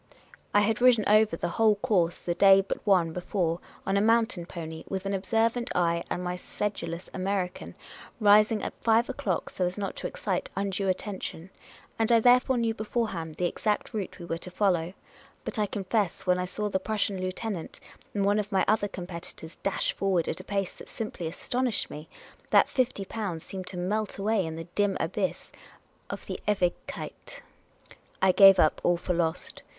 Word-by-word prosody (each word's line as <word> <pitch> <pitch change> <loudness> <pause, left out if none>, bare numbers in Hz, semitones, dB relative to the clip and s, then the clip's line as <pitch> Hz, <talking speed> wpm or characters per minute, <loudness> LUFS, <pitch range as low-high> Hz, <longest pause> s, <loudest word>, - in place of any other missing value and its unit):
I 205 - +5
had 220 +2 +1
ridden 245 -3 +6
over 215 -4 +4
the - - -2
whole 220 -2 +5
course 180 -4 0
the 175 - 0
day 195 +2 +7
but 195 - -5
one 175 -5 +4
be 180 - -4
fore, 175 -3 -1 0.3
on 195 +1 +1
a - - +3
mountain 225 -5 +2
pony, 160 -2 -7
with 190 0 -3
an 195 - -1
observant 225 +5 +1
eye 170 -1 +2
and - - -2
n\y 180 0 -2
sedulous 185 -3 -4
American 190 -1 -3 0.2
— - - -18
rising 210 +1 +5
at - - -3
five 225 +1 +3
o'clock, 185 -5 -2
so 185 - -2
as 180 +2 -1
not 200 -1 -3
to - - -3
excite - - -3
undue 195 -1 -1
attention; 185 -2 -4 0.5
and 225 +1 +2
I 230 - +7
therefore 250 +2 +4
knew 230 -1 +1
beforehand 210 -8 -3
the 180 - -1
exact 210 +6 -1
route 205 -4 -4
we 175 - -8
were 165 -1 -3
to 180 - -7
follow; 180 -3 +1 0.5
but - - -3
I 210 - +2
confess 200 -1 -1
when 180 -1 +3
I 180 - -1
saw 210 +3 -3
the 190 -2 0
Prus 215 +2 -1
sian 195 -2 -4
lieutenant 185 -1 -4 0.4
and 200 -1 +1
one 205 +1 +3
of 210 0 -3
my 190 -2 +2
other 210 -1 +2
competitors 175 -3 -8
dash 195 - 0
forward 190 -4 0
at - - -3
a - - -8
pace 195 -1 -2
that - - -13
simply 215 -7 -5
astonished 245 +7 -1
me, 150 +2 -9 0.4
that - - +5
fifty 250 -6 0
pounds 190 -7 -4
seemed 190 -1 -7
to 180 - -6
melt 205 +4 -1
away 200 -2 +1
in 160 - -5
the 165 - -5
dim 195 +3 0
abyss - - -2 0.6
of - - -6
the - - -5
Ewigkeit. 190 -4 -3 0.8
I 190 - +5
gave 195 0 +8
up 155 - +3
all 175 0 +3
for 180 +1 -2
lost. 170 -1 -2
195 Hz, 190 wpm, -28 LUFS, 180-215 Hz, 0.8 s, gave